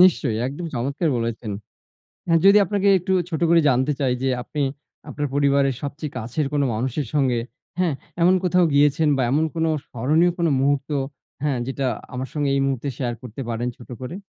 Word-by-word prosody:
নিশ্চয়ই 150 Hz, -11 st, +4 dB
একদম 145 Hz, +6 st, -5 dB
চমৎকার 140 Hz, +7 st, -1 dB
বলেছেন। 115 Hz, -2 st, -3 dB, 0.9 s
যদি 200 Hz, +1 st, +8 dB
আপনাকে 200 Hz, +1 st, 0 dB
একটু 185 Hz, +2 st, -1 dB, 0.2 s
ছোট 160 Hz, -2 st, -3 dB
করে 170 Hz, 0 st, +6 dB
জানতে 130 Hz, +2 st, +2 dB
চাই 130 Hz, -3 st, +1 dB
যে, 135 Hz, -, +2 dB
আপনি 150 Hz, +4 st, -4 dB, 0.5 s
আপনার 145 Hz, 0 st, -2 dB
পরিবারের 140 Hz, -1 st, +3 dB
সবচেয়ে 145 Hz, 0 st, -5 dB
কাছের 125 Hz, +6 st, -2 dB
কোনো 145 Hz, -1 st, +2 dB
মানুষের 130 Hz, +4 st, -2 dB
সঙ্গে, 130 Hz, -5 st, +2 dB, 0.4 s
হ্যাঁ, 175 Hz, -6 st, +1 dB, 0.3 s
এমন 180 Hz, +2 st, +5 dB
কোথাও 180 Hz, 0 st, +3 dB
গিয়েছেন 145 Hz, +2 st, +4 dB
বা 130 Hz, -, +1 dB
এমন 155 Hz, +4 st, +2 dB
কোনো 165 Hz, 0 st, +1 dB, 0.2 s
স্মরণীয় 155 Hz, +9 st, +2 dB
কোন 170 Hz, -1 st, +1 dB
মুহূর্ত, 140 Hz, +1 st, +1 dB, 0.5 s
হ্যাঁ, 140 Hz, -4 st, 0 dB
যেটা 135 Hz, 0 st, -2 dB, 0.3 s
আমার 130 Hz, +1 st, -4 dB
সঙ্গে 145 Hz, -2 st, 0 dB
এই 135 Hz, -, +2 dB
মুহূর্তে 135 Hz, 0 st, -1 dB
শেয়ার 120 Hz, -3 st, -2 dB
করতে 125 Hz, +1 st, -8 dB
পারেন 120 Hz, +1 st, -2 dB
ছোট 120 Hz, -, -14 dB
করে? 130 Hz, +6 st, -5 dB
140 Hz, 170 wpm, -23 LUFS, 130-160 Hz, 0.9 s, যদি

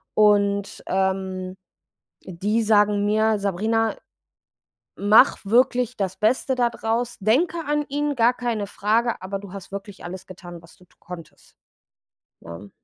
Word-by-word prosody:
und, 200 Hz, -1 st, +2 dB
ähm, 190 Hz, -1 st, -2 dB, 0.7 s
die 205 Hz, +6 st, -1 dB
sagen 210 Hz, -1 st, +3 dB
mir: 215 Hz, +1 st, +2 dB
„Sabrina, 220 Hz, +3 st, 0 dB, 1.0 s
mache 215 Hz, +6 st, +5 dB
wirklich 250 Hz, +1 st, +2 dB
das 190 Hz, -2 st, -2 dB
Beste 255 Hz, +4 st, +1 dB
da 245 Hz, -1 st, +2 dB
draus, 235 Hz, +1 st, -2 dB
denke 275 Hz, -, +2 dB
an 295 Hz, 0 st, 0 dB
ihn, 290 Hz, +1 st, -1 dB
gar 240 Hz, 0 st, +4 dB
keine 235 Hz, -4 st, -3 dB
Frage, 225 Hz, +4 st, 0 dB
aber 195 Hz, +1 st, -4 dB
du 200 Hz, -1 st, -11 dB
hast 195 Hz, -1 st, -9 dB
wirklich 200 Hz, 0 st, -8 dB
alles 185 Hz, +1 st, -8 dB
getan, 175 Hz, -2 st, -11 dB
was 165 Hz, -, -19 dB
du 180 Hz, -, -21 dB
konntest.“ 170 Hz, -3 st, -12 dB, 0.9 s
Ne? 85 Hz, +4 st, -10 dB
210 Hz, 130 wpm, -23 LUFS, 190-230 Hz, 1.0 s, mache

